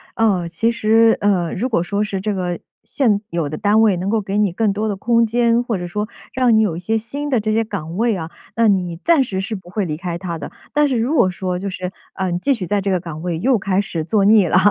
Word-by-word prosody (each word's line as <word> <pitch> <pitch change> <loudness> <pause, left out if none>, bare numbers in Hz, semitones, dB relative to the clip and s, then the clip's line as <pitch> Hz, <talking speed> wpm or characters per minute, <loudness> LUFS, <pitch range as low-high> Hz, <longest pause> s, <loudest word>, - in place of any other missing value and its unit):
呃， 200 -6 +1
其 185 +8 +1
实， 225 0 +4
呃， 185 -5 +1
如 245 +7 -2
果 195 -8 +1
说 200 +4 -1
是 200 -2 -3
这 210 +2 -2
个， 180 -2 -2 0.3
现 220 -8 +1
有 170 -5 -2
的 155 - -4
单 210 +1 +3
位 210 -5 +4
能 185 +3 -2
够 225 +1 +2
给 195 -1 -4
你 205 -3 +2
更 205 +3 0
多 215 +2 -2
的 205 - -1
空 230 +4 +2
间， 235 +1 +2
或 235 -4 -2
者 175 - -5
说 210 +4 -3 0.3
让 250 -3 +3
你 220 - +5
有 200 -7 0
一 - - -5
些 220 +5 0
新 285 +7 -4
的 255 -4 +2
这 215 0 -1
些 225 +1 +2
岗 175 -7 -6
位 230 0 +2
啊， 165 -1 -6 0.2
那 230 0 +3
你 180 -4 +1
暂 330 -5 +4
时 195 -7 -3
是 200 +3 -3
不 185 -3 -11
会 200 +2 -2
离 155 -3 -3
开 170 +1 -4
它 170 -2 -5
的。 - - -7 0.2
但 295 0 +3
是 260 -3 0
如 235 +6 0
果 240 -11 +4
说 180 0 -3
就 200 +1 -3
是， 185 -1 -5 0.2
呃， 190 -2 -2
你 175 - -1
继 275 - +1
续 225 -9 0
在 205 +2 0
这 195 - -2
个 185 -2 +1
岗 165 -3 -8
位 175 -1 -2
又 245 +6 +2
开 195 0 0
始 180 -5 -2
做 200 +4 +1
腻 210 -3 +5
了， 175 - +3
200 Hz, 295 characters per minute, -19 LUFS, 180-225 Hz, 0.3 s, 你